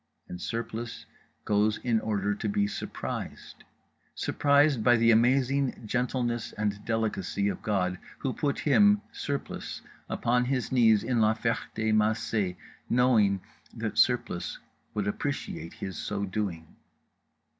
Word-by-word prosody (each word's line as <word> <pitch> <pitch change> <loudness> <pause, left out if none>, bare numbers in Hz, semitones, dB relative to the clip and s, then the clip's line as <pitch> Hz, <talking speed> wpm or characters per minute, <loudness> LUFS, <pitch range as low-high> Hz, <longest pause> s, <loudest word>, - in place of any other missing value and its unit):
And 90 0 -7
Surplice 115 0 -4 0.4
goes 105 +1 +2
in 115 -3 +1
order 105 -2 0
to 105 +1 -3
be 100 0 +2
surprised, 100 - -6 0.5
surprised 145 -4 +3
by 120 +1 +6
the 115 0 +5
amazing 130 +3 +2
gentleness 120 0 -1
and 105 -1 -2
delicacy 105 -3 0
of - - -4
God—Who 95 +5 -2
put 145 -3 -1
him, 205 +6 +4
Surplice, 140 -1 -5 0.3
upon 125 +1 +1
his 130 -2 -1
knees 110 -5 +5
in 120 -1 +1
La 110 0 +4
Ferté 110 -1 -1
Macé, 105 -3 +1 0.3
knowing 110 -6 +3 0.3
that - - -2
Surplice - - +1 0.4
would 105 -1 -1
appreciate 100 - -3
His 95 -1 -6
so 100 -1 -2
doing. 95 -5 -4
110 Hz, 120 wpm, -28 LUFS, 105-125 Hz, 0.5 s, by